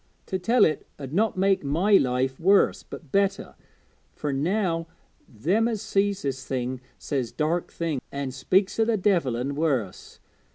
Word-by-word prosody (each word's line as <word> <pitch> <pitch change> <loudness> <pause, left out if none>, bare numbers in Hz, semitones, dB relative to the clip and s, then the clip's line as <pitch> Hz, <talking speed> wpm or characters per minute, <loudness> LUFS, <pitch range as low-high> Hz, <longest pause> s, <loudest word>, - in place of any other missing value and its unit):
To 190 - -3
tell 225 +5 +4
it 155 - -2
'ud 135 -1 -8
not 210 +2 +1
make 195 -1 +2
my 165 +9 +1
life 130 -1 0
worse 195 +4 +3
but 150 -6 -11
better, 195 0 0 0.6
fur 150 - -3
now 165 +3 0 0.4
them 180 - +1
as 225 -3 -2
sees 200 -1 0
this 135 -2 -3
thing 130 -1 -3 0.2
says 130 -5 -3
dark 160 +3 -1
things, 160 -6 -3
an' 140 -1 -3
speaks 190 - +1
o' 225 - +4
the 225 -1 +1
devil 175 - +1
an' 130 +4 -2
worse. 140 - -2
165 Hz, 160 wpm, -25 LUFS, 135-195 Hz, 0.6 s, tell